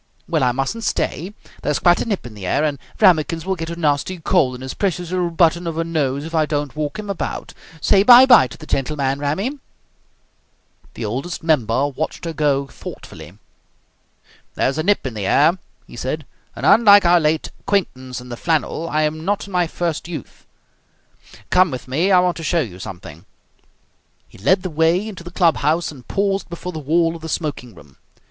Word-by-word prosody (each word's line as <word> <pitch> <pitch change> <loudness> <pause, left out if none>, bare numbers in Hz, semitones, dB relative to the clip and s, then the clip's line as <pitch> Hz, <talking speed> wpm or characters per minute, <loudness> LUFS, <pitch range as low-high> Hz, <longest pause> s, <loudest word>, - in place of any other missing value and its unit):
Well, 165 -3 0
I 125 - +3
mustn't 135 - -3
stay. 190 +1 -2 0.3
There's 150 - 0
quite 175 -1 +3
a - - -2
nip 205 - -3
in 120 - -9
the 100 -3 -7
air, 145 - +1
and 145 -3 -1 0.2
Rammikins 165 -1 +3
will 190 - 0
get 165 -2 -5
a 170 - -4
nasty 160 +3 0
cold 160 -6 +1
in 125 - -10
his 130 0 -5
precious 180 -3 -2
little 180 -1 0
button 170 +1 +2
of 165 -1 -4
a 165 - +1
nose 145 -4 -1
if 165 - -8
I 155 -2 +2
don't 145 -2 -3
walk 150 +4 -3
him 215 -1 -6
about. 200 -2 -4 0.3
Say 195 +5 +4
'Bye 245 +4 +9
bye' 245 - +7
to 115 - -12
the 155 - -11
gentleman, 140 -1 -1
Rammy!" 195 - -2 1.4
The 115 - -5
Oldest 135 +13 -4
Member 135 -4 +2
watched 145 +5 -5
her 165 - -3
go 145 -3 +1
thoughtfully. 135 - -11 1.2
"There - - +1
is 135 +3 -2
a - - +2
nip 200 +1 +1
in 130 - -3
the 105 -3 -3
air," 165 - +3 0.3
he - - -13
said, - - -4 0.3
"and, - - -5
unlike 205 -4 +7
our 175 0 +5
late 155 0 0
acquaintance 130 - -2
in 125 0 -12
the 120 - -6
flannel, 165 +2 -1
I 155 0 +1
am 155 +1 -2
not 205 +3 -1
in 200 - -12
my 180 -1 +2
first 170 -1 -3
youth. 160 -7 -9 1.0
Come 185 0 +5
with 130 -3 -7
me, 160 +10 +1
I 185 - +6
want 180 -1 0
to 165 - -7
show 170 +1 +1
you 95 - -6
something." 85 -2 -9 1.0
He - - -18
led 185 - +2
the 185 - -4
way 165 +6 +2
into 195 -5 -8
the 175 - -8
club 170 -2 +2
house, 155 +4 0
and 130 -5 -14
paused 195 -1 -1
before 175 +1 -6
the 160 - -6
wall 165 +3 +1
of 165 - -10
the 160 - -7
smoking 145 -8 -4
room. 70 -2 -17
160 Hz, 205 wpm, -20 LUFS, 140-180 Hz, 1.4 s, Bye